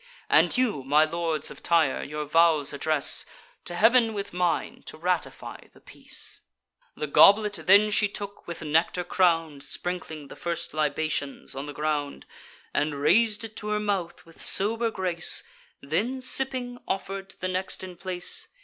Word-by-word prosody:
And - - +4
you, 230 - 0
my 150 +4 +4
lords 165 -2 -2
of - - -12
Tyre, 165 -5 +2
your 150 +1 -5
vows 155 -2 +3
address 150 0 0 0.4
To 175 - -5
Heav'n 225 +3 +4
with 200 -3 -5
mine, 180 -1 -1
to - - -6
ratify 180 +1 -3
the - - -19
peace." - - -4 0.5
The - - -3
goblet 205 +8 +6
then 205 +2 +6
she 210 0 +3
took, 200 0 -8
with 170 -1 -6
nectar 160 +3 +1
crown'd 165 -5 +1
(Sprinkling 160 -2 -5
the - - -11
first 170 -1 -4
libations 155 -2 -2
on 135 +2 -6
the - - -5
ground,) 150 -1 -2 0.5
And 150 0 0
rais'd 210 +10 +3
it 220 -1 -7
to 210 - -6
her 210 0 0
mouth 200 -5 -3
with 165 -1 -14
sober 225 +4 +3
grace; 180 -5 +1 0.4
Then, 210 - -1
sipping, 255 -1 -1
offer'd 195 0 -4
to - - -11
the 185 - -2
next 185 +1 -2
in 185 -1 -8
place. 180 0 -3
175 Hz, 160 wpm, -26 LUFS, 155-205 Hz, 0.5 s, goblet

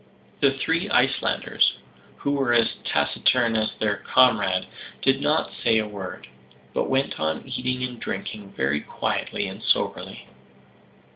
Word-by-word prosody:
The 140 -1 +5
three 165 +7 0
Icelanders, 135 -5 +2 0.4
who 140 - -1
were 135 -4 +2
as 115 -1 +3
taciturn 120 -3 +2
as 110 0 +1
their 105 -2 +1
comrade, 110 -8 +3 0.4
did - - +3
not - - +1
say 110 - +4
a 110 -1 0
word; 95 -8 -7 0.5
but - - 0
went 135 +1 0
on 80 0 -1
eating 125 0 -2
and 125 -2 -10
drinking 105 -3 -5
very 70 +3 +1
quietly - - -2
and - - -7
soberly. - - -1
115 Hz, 135 wpm, -24 LUFS, 100-130 Hz, 0.5 s, The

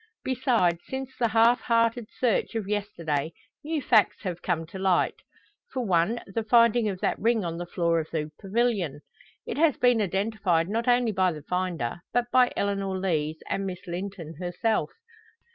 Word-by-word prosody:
Besides, 230 -10 +1
since 265 0 -5
the 240 -2 +1
half 230 +2 +4
hearted 230 -1 +1
search 240 -1 +1
of 215 -4 -2
yesterday 170 -8 -2 0.3
new 305 -1 -2
facts 220 -2 +3
have 180 -3 -4
come 165 -3 -1
to 180 +4 -9
light; 190 -2 +2 0.5
for 255 -2 -2
one, 190 +5 +1
the 195 +4 -3
finding 230 0 +4
of 190 -2 -4
that - - 0
ring 225 -3 +2
on 170 0 -4
the 175 - -5
floor 170 -2 +1
of 160 - -5
the 155 -2 -3
pavilion. 195 - 0 0.4
It - - -4
has 315 -4 +4
been 245 -2 +3
identified 195 -3 0
not 230 +3 -1
only 245 -2 +3
by 185 -2 +2
the 150 -2 -9
finder, 175 -6 -2
but 245 0 0
by 250 -1 +5
Eleanor 195 -1 -1
Lees 160 -4 -1
and 195 0 -2
Miss 185 0 -7
Linton 175 -3 -6
herself. 185 +5 0
195 Hz, 170 wpm, -27 LUFS, 175-230 Hz, 0.5 s, by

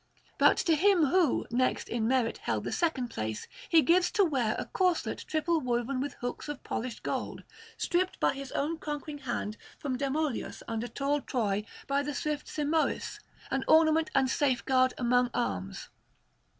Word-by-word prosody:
But - - +6
to 335 - +2
him 360 0 +4
who, 335 -1 +2
next 255 +2 +1
in 225 -1 -1
merit, 250 -2 +1
held - - -2
the - - -3
second 285 -8 0
place, 110 - -4 0.2
he 320 -2 +6
gives 355 +2 +4
to 405 - +4
wear 250 -9 +1
a - - -3
corslet 365 -3 0
triple 320 +1 +1
woven 250 +1 -1
with 285 - -4
hooks 245 +4 -5
of 295 - -6
polished 240 0 -4
gold, - - -3 0.3
stripped 365 +2 0
by - - +3
his 275 -1 -7
own 315 +3 -1
conquering 295 -1 -5
hand 240 -5 -3 0.2
from 260 -3 -3
Demoleos 280 -1 -2
under 230 +1 -2
tall 280 +3 -1
Troy 210 -6 -1 0.2
by 275 0 +1
the 290 0 -4
swift 300 0 -2
Simoïs, 310 +1 -1 0.3
an 270 0 0
ornament 315 0 +5
and 265 -1 +4
safeguard 260 -1 +2
among 245 0 +2
arms. 95 - -3
275 Hz, 165 wpm, -30 LUFS, 245-315 Hz, 0.3 s, But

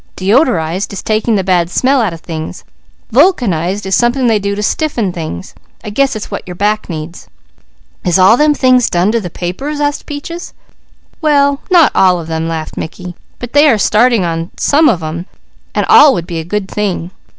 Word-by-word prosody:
'Deodorized,' 190 - +1
is 200 - -6
taking 220 +1 0
the 195 - 0
bad 180 -2 +1
smell 260 +7 +2
out 215 -5 0
of 165 -1 -10
things. 160 -2 -7 0.5
'Vulcanized,' 210 - +1
is 190 - -3
something 240 +4 +2
they 225 -3 +3
do 200 0 -2
to 210 - -4
stiffen 235 - -1
things. 155 - -6 0.3
I 210 - -6
guess 275 +3 +1
it's 215 - -7
what - - -4
your 180 - -7
back 210 +3 -1
needs." 165 +1 -7 0.8
"Is 180 -1 +2
all 190 +4 +6
them 300 +3 +2
things 255 -3 +3
done 180 +4 +1
to 230 0 0
the 180 - -6
papers?" 265 - -5
asked 290 -1 -2
Peaches. 335 +4 -7 0.7
"Well, 285 -2 +2
not 345 -5 +5
all 180 -2 +3
of 165 - -7
them," 160 0 -3
laughed 160 -1 -5
Mickey, 180 +2 -6 0.2
"but 245 -1 -8
they 295 +1 +5
are 230 - +3
starting 220 +1 +3
in 170 - -1
on 165 +1 -4
some 305 +2 +3
of 175 - 0
them, 165 +3 -5 0.5
and - - +1
all 295 -2 +7
would 170 -2 -4
be 170 -1 -5
a - - -4
good 195 +3 -3
thing. 190 -4 -3
205 Hz, 195 wpm, -13 LUFS, 175-260 Hz, 0.8 s, all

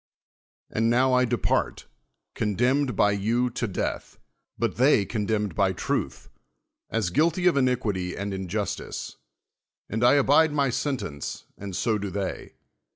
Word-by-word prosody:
And 115 +1 +1
now 130 +2 +3
I 125 0 +4
depart, 115 - -1 0.5
condemned 125 +5 +1
by 105 - +4
you 115 +5 0
to 120 0 -2
death; 95 - -4 0.4
but - - -1
they 125 -5 +4
condemned 105 -2 -1
by 95 +2 +2
truth, - - -3 0.6
as 110 -6 -1
guilty 170 - +2
of 180 - +5
iniquity 115 -9 0
and 100 0 -3
injustice: 95 +2 -4 0.7
and 110 +3 -2
I 125 +4 +6
abide 145 +3 +4
my 140 -3 +1
sentence 125 - -4
and 100 -2 -7
so 110 +2 0
do 100 0 -4
they. 95 -1 -5
115 Hz, 135 wpm, -26 LUFS, 100-130 Hz, 0.7 s, I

